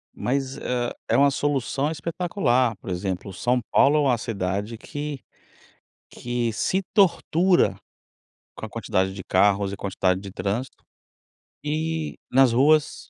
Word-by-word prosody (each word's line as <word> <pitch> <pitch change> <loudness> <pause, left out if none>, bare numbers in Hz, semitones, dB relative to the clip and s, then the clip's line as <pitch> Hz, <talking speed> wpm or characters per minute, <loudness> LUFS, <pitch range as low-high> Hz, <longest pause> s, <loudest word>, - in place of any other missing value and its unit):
Mas, 135 +1 -2
hã, 120 -3 -2 0.2
é - - +2
uma 140 0 +5
solução 140 0 -1
espetacular. 150 - 0
Por - - -10
exemplo, 95 +1 -3
São 125 +5 0
Paulo 145 +2 +5
é - - +4
uma 130 -4 +2
cidade 105 0 -3
que 145 +2 -6 0.9
que 120 -2 -2
se 190 - 0
tortura 180 -2 +3 0.8
com - - -6
a - - -16
quantidade 95 +1 -1
de 95 - -7
carros 100 +1 +2
e - - -6
a - - -6
quantidade 95 -1 0
de 100 -2 -8
trânsito. 110 +8 -4 0.8
E 155 +1 -2 0.2
nas 130 -2 +5
ruas 150 +4 +2
125 Hz, 140 wpm, -24 LUFS, 100-150 Hz, 0.9 s, uma